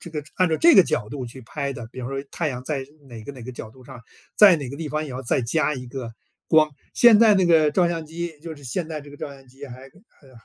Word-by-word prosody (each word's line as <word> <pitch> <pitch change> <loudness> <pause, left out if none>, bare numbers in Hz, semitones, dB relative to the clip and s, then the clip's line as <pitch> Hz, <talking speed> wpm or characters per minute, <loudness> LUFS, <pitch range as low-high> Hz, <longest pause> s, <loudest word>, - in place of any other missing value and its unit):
这 170 - -10
个 150 -2 -5
按 185 -2 +3
照 160 - +1
这 340 -1 +6
个 190 - +9
角 105 -10 -2
度 135 -2 -6
去 125 +3 -11
拍 140 +3 -4
的 120 -4 -8
比 130 - -8
方 125 - -5
说 135 0 -4
太 165 -3 -1
阳 125 -1 -6
在 135 -2 -3 0.2
哪 115 -2 -10
个 - - -7
哪 130 -3 -11
个 130 +2 -8
角 110 - -9
度 130 +2 -18
上， 120 - -12 0.3
在 195 -5 +8
哪 140 -4 -6
个 140 - -7
地 160 0 -5
方 155 +1 -2
也 140 - -8
要 130 +1 -6
再 125 - 0
加 150 +5 0
一 125 -1 -8
个 120 -2 -7 0.4
光。 155 -1 +4 0.2
现 235 -3 +7
在 220 -3 +6
那 185 -2 +3
个 160 -3 +4
照 175 +1 +3
相 165 -2 -3
机 165 0 -6
就 160 -2 -8
是 145 - -15
现 160 +6 -3
代 155 -2 -5
这 145 - -14
个 145 - -12
照 - - -6
相 135 -1 -15
机 135 +3 -11
还， 125 +1 -11
呃 140 - -21
145 Hz, 310 characters per minute, -23 LUFS, 130-165 Hz, 0.4 s, 个